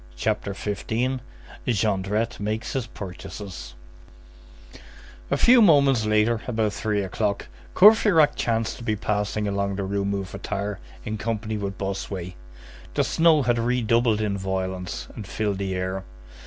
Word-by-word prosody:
CHAPTER 100 Hz, +10 st, -1 dB
XV—JONDRETTE 110 Hz, -2 st, -2 dB
MAKES 110 Hz, +2 st, -3 dB
HIS 130 Hz, -4 st, -2 dB
PURCHASES 95 Hz, -, -8 dB, 1.5 s
A -, -, +1 dB
few 245 Hz, 0 st, +6 dB
moments 140 Hz, -, +5 dB
later, 110 Hz, +1 st, +2 dB
about 110 Hz, -4 st, 0 dB
three 105 Hz, -2 st, -1 dB
o'clock, 100 Hz, +2 st, -2 dB, 0.3 s
Courfeyrac 200 Hz, -6 st, +7 dB
chanced 115 Hz, -1 st, -1 dB
to -, -, -9 dB
be 110 Hz, -2 st, 0 dB
passing 105 Hz, 0 st, -1 dB
along 100 Hz, 0 st, -1 dB
the 100 Hz, -, -2 dB
Rue 100 Hz, +1 st, -1 dB
Mouffetard 100 Hz, +1 st, -3 dB, 0.3 s
in 110 Hz, -2 st, -3 dB
company 110 Hz, -1 st, -2 dB
with 100 Hz, -1 st, -4 dB
Bossuet. 95 Hz, -2 st, -4 dB, 0.6 s
The -, -, +3 dB
snow 160 Hz, -3 st, +4 dB
had 120 Hz, -1 st, +2 dB
redoubled 115 Hz, -2 st, +2 dB
in 100 Hz, -2 st, -1 dB
violence, 95 Hz, -7 st, -3 dB
and 105 Hz, -, -7 dB
filled 105 Hz, -1 st, -2 dB
the 95 Hz, -1 st, -2 dB
air. 95 Hz, +1 st, -2 dB
105 Hz, 130 wpm, -25 LUFS, 100-115 Hz, 1.5 s, Courfeyrac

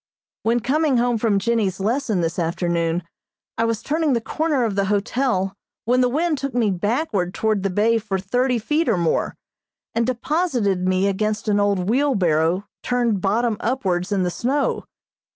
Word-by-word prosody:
When 235 Hz, +1 st, +1 dB
coming 285 Hz, +2 st, +2 dB
home 240 Hz, -1 st, +1 dB
from 215 Hz, -3 st, +2 dB
Jennie's 200 Hz, -3 st, 0 dB
lesson 220 Hz, -1 st, 0 dB
this 165 Hz, +2 st, -2 dB
afternoon 170 Hz, 0 st, 0 dB, 0.6 s
I 230 Hz, -, +3 dB
was 230 Hz, -2 st, -1 dB
turning 310 Hz, -1 st, +1 dB
the 235 Hz, -, +2 dB
corner 300 Hz, +2 st, 0 dB
of 225 Hz, -3 st, 0 dB
the 200 Hz, 0 st, +1 dB
hotel 205 Hz, -1 st, 0 dB, 0.3 s
when 250 Hz, +3 st, +3 dB
the 250 Hz, -, +3 dB
wind 310 Hz, +2 st, 0 dB
took 275 Hz, -2 st, -4 dB
me 225 Hz, -4 st, +2 dB
backward 205 Hz, -, -1 dB
toward 215 Hz, -2 st, +1 dB
the 195 Hz, -, 0 dB
bay 220 Hz, +5 st, +2 dB
for 205 Hz, -3 st, -2 dB
thirty 245 Hz, +7 st, 0 dB
feet 300 Hz, +7 st, 0 dB
or 215 Hz, -, +2 dB
more, 170 Hz, -2 st, 0 dB, 0.6 s
and 230 Hz, 0 st, +1 dB
deposited 245 Hz, -, 0 dB
me 185 Hz, +1 st, +2 dB
against 215 Hz, +3 st, -1 dB
an 205 Hz, -1 st, +2 dB
old 200 Hz, -3 st, +1 dB
wheelbarrow 190 Hz, -, +2 dB, 0.2 s
turned 240 Hz, -5 st, 0 dB
bottom 220 Hz, +3 st, +1 dB
upwards 195 Hz, -7 st, -1 dB
in 195 Hz, -2 st, +1 dB
the 180 Hz, -, 0 dB
snow. 275 Hz, +9 st, -1 dB
220 Hz, 170 wpm, -22 LUFS, 190-250 Hz, 0.6 s, I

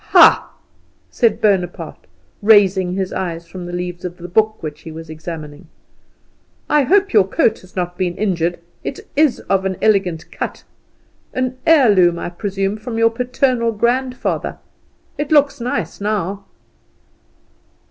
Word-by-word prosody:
"Ha!" -, -, +7 dB, 0.6 s
said 230 Hz, -2 st, +2 dB
Bonaparte, 180 Hz, -6 st, -1 dB, 0.3 s
raising 195 Hz, -4 st, +4 dB
his 190 Hz, -1 st, -2 dB
eyes 170 Hz, -2 st, -4 dB
from 180 Hz, 0 st, -8 dB
the -, -, -6 dB
leaves 175 Hz, 0 st, -5 dB
of 180 Hz, -1 st, -6 dB
the 175 Hz, -, -8 dB
book 215 Hz, +4 st, +2 dB
which 155 Hz, 0 st, -6 dB
he 160 Hz, -, -9 dB
was 160 Hz, 0 st, -9 dB
examining, 155 Hz, 0 st, -8 dB, 1.0 s
"I 300 Hz, -, +4 dB
hope 390 Hz, +7 st, +2 dB
your 200 Hz, -4 st, +5 dB
coat 205 Hz, -, +1 dB
has 185 Hz, -, -19 dB
not 180 Hz, -1 st, -3 dB
been 180 Hz, -2 st, -1 dB
injured; 175 Hz, -4 st, 0 dB, 0.3 s
it 275 Hz, -, -5 dB
is 300 Hz, -4 st, +3 dB
of 195 Hz, -1 st, 0 dB
an 190 Hz, -1 st, -2 dB
elegant 195 Hz, -6 st, +1 dB
cut. -, -, -5 dB, 0.7 s
An 255 Hz, 0 st, -1 dB
heirloom, 205 Hz, -, +5 dB
I 175 Hz, -, -5 dB
presume, 195 Hz, +2 st, -2 dB
from 225 Hz, +1 st, -6 dB
your 230 Hz, 0 st, +4 dB
paternal 250 Hz, 0 st, 0 dB
grandfather? 250 Hz, +4 st, -1 dB, 0.6 s
It 295 Hz, 0 st, -3 dB
looks 285 Hz, -3 st, +3 dB
nice 240 Hz, -3 st, -3 dB
now." 200 Hz, -1 st, -2 dB
195 Hz, 140 wpm, -18 LUFS, 175-235 Hz, 1.0 s, Ha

